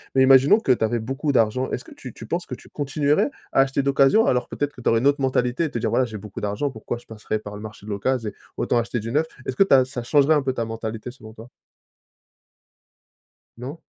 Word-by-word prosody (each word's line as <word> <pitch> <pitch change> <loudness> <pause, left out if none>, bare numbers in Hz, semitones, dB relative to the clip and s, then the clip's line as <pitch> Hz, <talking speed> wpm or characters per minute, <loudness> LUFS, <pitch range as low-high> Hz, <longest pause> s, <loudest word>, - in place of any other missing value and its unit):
mais 130 - +5
imaginons 135 - +6
que 135 - +2
tu 120 -3 +2
avais 120 +2 -1
beaucoup 135 +6 -2
d'argent. 125 +2 +2
Est-ce 125 - -3
que - - -14
tu 130 -4 -10
tu 115 - -10
penses 170 +9 -3
que - - -6
tu - - -17
continuerais 145 - 0 0.2
à - - +2
acheter 135 +1 +2
d'occasion 140 +10 +4
alors 125 -1 +1
peut-être 145 0 -3
que 125 - -12
tu - - -4
aurais 115 - +3
une 130 - +2
autre 140 +1 +3
mentalité 130 +3 +1
et 155 - -4
te 120 - -3
dire: - - -1
«Voilà, 130 - +2
j'ai 110 -3 -7
beaucoup 105 -1 -9
d'argent, 105 +7 -2
pourquoi 115 0 -5
je 120 - -17
passerai 110 0 -4
par 105 -1 -9
le - - -9
marché 105 -1 -10
de - - -9
l'occase 115 +4 -1
et 105 - -4 0.2
autant - - 0
acheter 120 0 -1
du 115 +2 -5
neuf». 150 +5 +2 0.2
Est-ce 130 - -3
que - - +7
tu 195 - +2
as 130 - +6
ça 130 -1 -6
changerait 145 +4 +4
un 150 - +2
peu 135 -1 -1
ta 115 - -2
mentalité 115 +1 -5
selon 110 -4 -13
toi? 115 +2 -13 2.1
Non? 135 +7 -7
125 Hz, 255 wpm, -23 LUFS, 115-140 Hz, 2.1 s, que